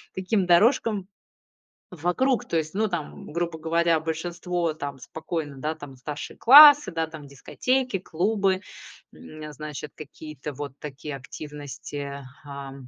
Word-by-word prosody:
таким 190 +1 0
дорожкам 205 +1 +3 0.8
вокруг. 205 - 0
То - - -3
есть, 160 +2 -3
ну 215 +2 +2
там, 175 -6 -6
грубо 170 0 -2
говоря, 165 +1 +2
большинство 170 +1 -2
там 140 -3 -6
спокойно, 155 +1 -5
да 150 +4 -2
там, 145 -4 -11
старшие 145 +3 -7
классы, 290 +3 +9
да 165 -1 -1
там, 155 -2 -10
дискотеки, 250 - -1
клубы, 190 +2 0 0.5
м, 155 0 -12
э, 150 0 -7
значит, 150 0 -7
какие-то 155 -1 -8
вот 140 0 -6
такие 145 0 -7
активности. 145 0 -7 0.2
А, 140 -1 -8
160 Hz, 130 wpm, -25 LUFS, 145-185 Hz, 0.8 s, классы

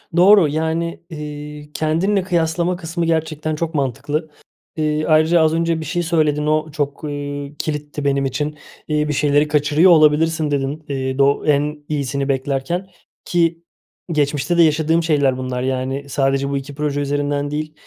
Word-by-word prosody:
Doğru. 185 0 +6
Yani, 160 +3 -2
iii, 150 -1 -8
kendinle 180 +6 +1
kıyaslama 170 0 0
kısmı 170 -1 -3
gerçekten 160 -1 -1
çok 165 +2 -3
mantıklı. 145 +3 -2 0.5
İii, 155 0 0
ayrıca 160 +2 +4
az 160 0 +3
önce 165 0 0
bir 160 - -6
şey 175 +3 -1
söyledin, 155 -3 +1
o 155 0 0
çok, 145 0 -3
iii, 145 -1 -5
kilitti 150 -1 -4
benim 140 -1 +1
için, 150 +3 -2 0.3
iii, 150 -1 0
bir 150 - -1
şeyleri 145 +1 +2
kaçırıyor 150 +4 +4
olabilirsin 155 0 +4
dedin, 140 +2 -2
iii, 130 -1 -2
doğ 140 0 +2
en 150 0 +1
iyisini 140 -2 -2
beklerken 140 +7 -1 0.4
ki 170 -1 +1 0.5
geçmişte 150 +2 0
de 170 - +7
yaşadığım 160 +1 +2
şeyler 140 -5 +2
bunlar. 130 -1 -3
Yani, 130 +2 -2
sadece 135 0 0
bu 140 - -1
2 140 +1 -7
proje 145 -1 -1
üzerinden 145 0 -1
değil, 155 +1 -3
150 Hz, 155 wpm, -19 LUFS, 140-160 Hz, 0.5 s, de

